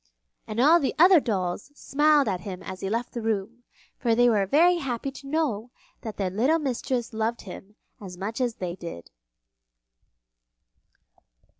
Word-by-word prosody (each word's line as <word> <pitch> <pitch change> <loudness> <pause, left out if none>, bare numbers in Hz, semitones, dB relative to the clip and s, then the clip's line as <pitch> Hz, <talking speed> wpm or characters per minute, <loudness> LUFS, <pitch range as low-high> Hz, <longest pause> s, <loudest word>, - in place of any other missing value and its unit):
And 215 +1 -4
all 310 +7 +6
the 275 - -1
other 355 +2 +7
dolls 195 -3 -2
smiled 295 -1 +3
at 190 -3 -1
him 190 -3 -7
as 190 -1 -7
he 195 - -3
left 230 +3 -2
the 235 - -4
room, 220 +1 -2 0.4
for 235 -3 +2
they 245 +1 +5
were 205 -4 +2
very 345 - +4
happy 270 -3 -3
to 275 0 -12
know 275 -7 -1 0.3
that 220 -3 -7
their 190 -3 -1
little 255 - +2
mistress 255 -4 -2
loved 220 +2 -2
him 195 +2 -11 0.3
as 185 -3 -9
much 215 +7 -4
as 240 -2 0
they 180 -2 -4
did. 170 - -9
230 Hz, 160 wpm, -26 LUFS, 195-275 Hz, 0.4 s, other